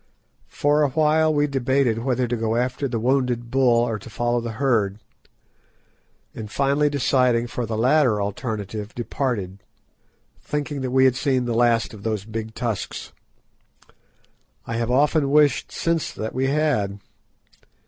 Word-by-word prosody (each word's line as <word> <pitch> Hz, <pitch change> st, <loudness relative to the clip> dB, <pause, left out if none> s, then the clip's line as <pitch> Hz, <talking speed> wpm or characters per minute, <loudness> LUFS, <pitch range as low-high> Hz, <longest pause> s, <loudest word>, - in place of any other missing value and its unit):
For 145 Hz, +1 st, +1 dB
awhile 155 Hz, +2 st, +3 dB
we 145 Hz, -1 st, +2 dB
debated 130 Hz, -4 st, +1 dB
whether 125 Hz, 0 st, 0 dB
to 120 Hz, -, -1 dB
go 115 Hz, -1 st, -1 dB
after 125 Hz, +3 st, -1 dB
the 120 Hz, -3 st, -2 dB
wounded 125 Hz, -1 st, 0 dB
bull 125 Hz, -3 st, +3 dB
or 110 Hz, -2 st, -3 dB
to 100 Hz, -, -11 dB
follow 120 Hz, +2 st, -1 dB
the 115 Hz, -1 st, -5 dB
herd, 110 Hz, -6 st, +1 dB, 1.4 s
and 105 Hz, -2 st, -7 dB
finally 140 Hz, +5 st, +1 dB
deciding 125 Hz, -4 st, +2 dB
for 120 Hz, -1 st, -4 dB
the 110 Hz, 0 st, -3 dB
latter 125 Hz, -2 st, +3 dB
alternative, 105 Hz, 0 st, -4 dB
departed, 115 Hz, -6 st, -3 dB, 0.8 s
thinking 145 Hz, -1 st, -3 dB
that 130 Hz, -, -2 dB
we 130 Hz, +1 st, +4 dB
had 130 Hz, -1 st, +4 dB
seen 130 Hz, -2 st, 0 dB
the 120 Hz, -, -1 dB
last 115 Hz, -1 st, +2 dB
of 105 Hz, -, -11 dB
those 105 Hz, -2 st, -3 dB
big 110 Hz, 0 st, -6 dB
tusks. 115 Hz, -6 st, -4 dB, 1.5 s
I 115 Hz, -, -4 dB
have 115 Hz, 0 st, -1 dB
often 145 Hz, +2 st, +2 dB
wished 150 Hz, 0 st, +3 dB
since 165 Hz, -2 st, -1 dB
that 110 Hz, +1 st, -5 dB
we 130 Hz, +1 st, 0 dB
had. 135 Hz, -9 st, 0 dB
125 Hz, 145 wpm, -23 LUFS, 115-140 Hz, 1.5 s, we